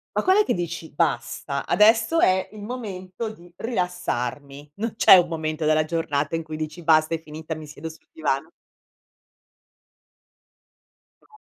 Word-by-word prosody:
Ma - - +1
quand'è 390 +3 +5
che - - 0
dici: 170 -2 -4
"Basta, 145 -2 -1
adesso 225 +9 +4
è 185 -6 +3
il 215 -1 -10
momento 210 -3 -5
di 175 -5 -13
rilassarmi." 145 - -3
Non 220 +2 -3
c'è - - +9
un 175 -2 +4
momento 155 -1 -3
della 155 0 +3
giornata 155 -2 -1
in 165 - -2
cui 155 0 -7
dici: 155 +2 -6
"Basta, 155 0 +4
è 165 - -7
finita, 160 +1 -7
mi 155 - -9
siedo 150 +1 -8
sul 160 - -16
divano." 155 0 -2 2.7
No. 430 - -22
165 Hz, 145 wpm, -24 LUFS, 155-190 Hz, 2.7 s, c'è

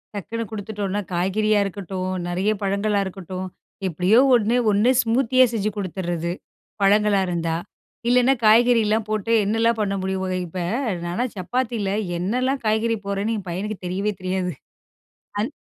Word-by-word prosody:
டக்குனு 230 +4 -4
கொடுத்துட்டோம்னா, 205 -1 -3
காய்கறியா 205 +4 +2
இருக்கட்டும், 190 -1 -4 0.2
நெறைய 185 +4 0
பழங்களா 200 +1 +1
இருக்கட்டும், 185 0 -6 0.4
எப்படியோ 185 +7 +3 0.2
1. 230 +1 +2 0.2
1 210 +5 +3
ஸ்மூத்தியா 255 +2 +3
செஞ்சு 215 -1 0
குடுத்துடுர்றது. 175 -3 -3 0.5
பழங்களா 205 0 +4
இருந்தா. 165 -2 -1 0.5
இல்லைன்னா 250 +2 +5
காய்கறில்லாம் 225 -1 +4
போட்டு 215 +1 -1
என்னலாம் 225 +3 +2
பண்ண 200 -1 0
முடியுமோங்க? 190 -1 -2
இப்ப 180 +3 -6 0.5
நான்லாம் 200 +8 -2
சப்பாத்தில, 225 +1 -2 0.3
என்னாலாம் 255 +9 0
காய்கறி 220 +1 +2
போடுறேன்னு 200 +3 -1
என் 190 -2 -8
பையனுக்கு 200 +4 -3
தெரியவே 195 +4 -1
தெரியாது. 185 -1 -1 0.9
அது 215 +5 0
205 Hz, 125 wpm, -23 LUFS, 185-225 Hz, 0.9 s, இல்லைன்னா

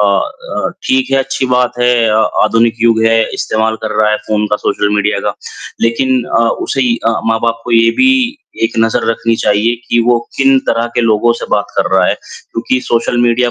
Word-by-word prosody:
अ, 100 -1 -1 0.2
ठीक 130 0 +1
है, - - +4
अच्छी 135 0 -2
बात 125 -1 +1
है 125 0 +3 0.2
अ, 110 - +1 0.3
आधुनिक 115 0 +2
युग 115 -1 +3
है, 115 0 +3
इस्तेमाल 110 0 -1
कर 110 - -3
रहा 105 0 +3
है 105 - +1
फ़ोन 105 0 0
का, 105 - +1
सोशल 105 - -1
मीडिया 105 +1 0
का। - - -2 0.5
लेकिन 130 +2 +1
अ, - - 0 0.3
उसे 135 - -1 0.3
अ, - - +4 0.2
माँ-बाप 115 0 0
को 120 - -6
ये 115 0 +4
भी 260 0 +5 0.5
एक 115 - 0
नज़र 115 0 +1
रखनी 115 0 0
चाहिए 105 +3 +1
कि 120 - +2
वो 120 -1 +3 0.2
किन 135 0 +4
तरह 115 +1 +1
के - - +1
लोगों 115 +1 +2
से - - -6
बात 105 - +1
कर - - +1
रहा 90 - +3
है, - - +1
क्योंकि 125 +2 -5
सोशल 120 0 -1
मीडिया 120 0 +2
115 Hz, 200 wpm, -13 LUFS, 110-125 Hz, 0.5 s, भी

